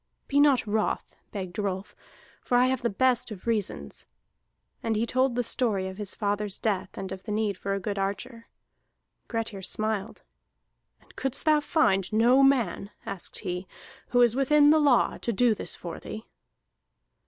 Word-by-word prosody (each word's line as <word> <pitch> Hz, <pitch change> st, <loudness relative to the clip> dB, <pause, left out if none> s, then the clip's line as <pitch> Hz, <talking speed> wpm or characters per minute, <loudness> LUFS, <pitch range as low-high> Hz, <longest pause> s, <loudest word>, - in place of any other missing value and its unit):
"Be 285 Hz, -, +2 dB
not 285 Hz, -5 st, +5 dB
wroth," 215 Hz, 0 st, -1 dB, 0.2 s
begged 185 Hz, -2 st, -5 dB
Rolf, 195 Hz, -1 st, -3 dB, 0.5 s
"for 245 Hz, -, +1 dB
I 250 Hz, -, +5 dB
have 260 Hz, -1 st, 0 dB
the 235 Hz, -, +1 dB
best 250 Hz, +3 st, +1 dB
of 205 Hz, -4 st, -9 dB
reasons." 200 Hz, -, -2 dB, 0.7 s
And 225 Hz, -1 st, -1 dB
he 220 Hz, +2 st, +1 dB
told 255 Hz, +1 st, +1 dB
the 245 Hz, -, +1 dB
story 215 Hz, -5 st, 0 dB
of 190 Hz, 0 st, -7 dB
his 205 Hz, -2 st, -4 dB
father's 205 Hz, -1 st, -2 dB
death 195 Hz, -4 st, -2 dB
and 190 Hz, -1 st, -5 dB
of 190 Hz, -1 st, -6 dB
the 210 Hz, -, -7 dB
need 210 Hz, -1 st, 0 dB
for 195 Hz, +2 st, -3 dB
a -, -, -2 dB
good 200 Hz, +1 st, -3 dB
archer. 230 Hz, +5 st, -4 dB, 0.8 s
Grettir 225 Hz, -4 st, -3 dB
smiled. 215 Hz, +2 st, -2 dB, 0.8 s
"And -, -, -22 dB
couldst 270 Hz, +2 st, -1 dB
thou 305 Hz, -1 st, +5 dB
find 290 Hz, -, +1 dB
no 240 Hz, +5 st, +5 dB
man," 240 Hz, -8 st, +2 dB, 0.2 s
asked 190 Hz, -, -5 dB
he, 180 Hz, +1 st, -4 dB, 0.4 s
"who 245 Hz, -, +3 dB
is 235 Hz, -1 st, +3 dB
within 290 Hz, +2 st, +5 dB
the 315 Hz, -, +5 dB
law, 280 Hz, -5 st, +3 dB
to 235 Hz, -, -2 dB
do 235 Hz, +2 st, +3 dB
this -, -, -6 dB
for 170 Hz, -2 st, -7 dB
thee?" 220 Hz, -, -8 dB
220 Hz, 170 wpm, -27 LUFS, 195-250 Hz, 0.8 s, not